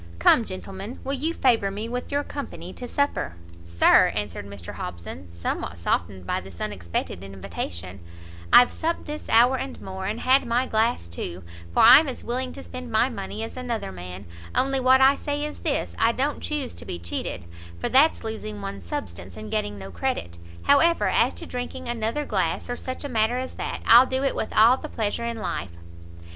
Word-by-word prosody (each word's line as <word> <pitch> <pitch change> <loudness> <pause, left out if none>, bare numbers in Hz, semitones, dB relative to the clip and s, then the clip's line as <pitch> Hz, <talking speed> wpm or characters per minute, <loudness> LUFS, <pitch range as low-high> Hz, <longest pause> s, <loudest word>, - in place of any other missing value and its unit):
Come, 160 - +5
gentlemen, 195 +4 -7
will 275 - -2
you 295 +4 0
favour 230 -6 +3
me 210 +3 -4
with 245 +3 -4
your 285 +1 +1
company 185 - -7
to 245 - -7
supper?" 285 - -1 0.3
"Sir," 85 0 +6
answered 105 -1 -4
Mr 100 -4 -8
Hobson, 85 +1 -7
somewhat 85 +1 -4
softened 90 +2 -1
by - - -1
this 90 -2 -12
unexpected 90 -3 -3
invitation, 95 -1 -6 0.5
"I've 245 - +8
supped 335 +1 -2
this 300 0 -6
hour 245 +4 +5
and 270 - -5
more, 190 0 -6
and 215 +3 -3
had 265 +2 +4
my 240 +2 +1
glass 220 - +1
too, 85 +1 -6 0.3
for - - +4
I'm 270 +7 +9
as 260 - -5
willing 255 +2 -2
to 275 - -9
spend 250 -1 -8
my 220 +4 +3
money 215 -1 -5
as 225 - -6
another 240 - -3
man; 90 +1 -8 0.3
only 270 0 +2
what 260 +1 +5
I 270 +1 +7
say 290 +1 -2
is 300 - -6
this, - - -1
I 230 +1 +4
don't 280 +4 -1
chuse 295 -5 -3
to - - -9
be - - -4
cheated, 85 +1 -4 0.4
for - - -1
that's 285 +5 +4
losing 215 - -5
one's 100 -2 -6
substance, 85 +1 -6
and 110 0 -8
getting 105 0 -1
no 95 0 -8
credit; 85 0 -3 0.2
however, 330 +4 +4
as - - +2
to - - -6
drinking 250 +1 -5
another 240 +5 -1
glass, - - -1
or - - -1
such 255 +3 -5
a - - -3
matter 225 0 +1
as 255 0 -4
that, - - -4
I'll 240 +3 +8
do 260 +1 -1
it 275 - +1
with - - -3
all 230 +4 +7
the - - -8
pleasure 220 +1 -2
in 235 -1 -3
life." 95 - -4
225 Hz, 195 wpm, -25 LUFS, -, 0.5 s, I'm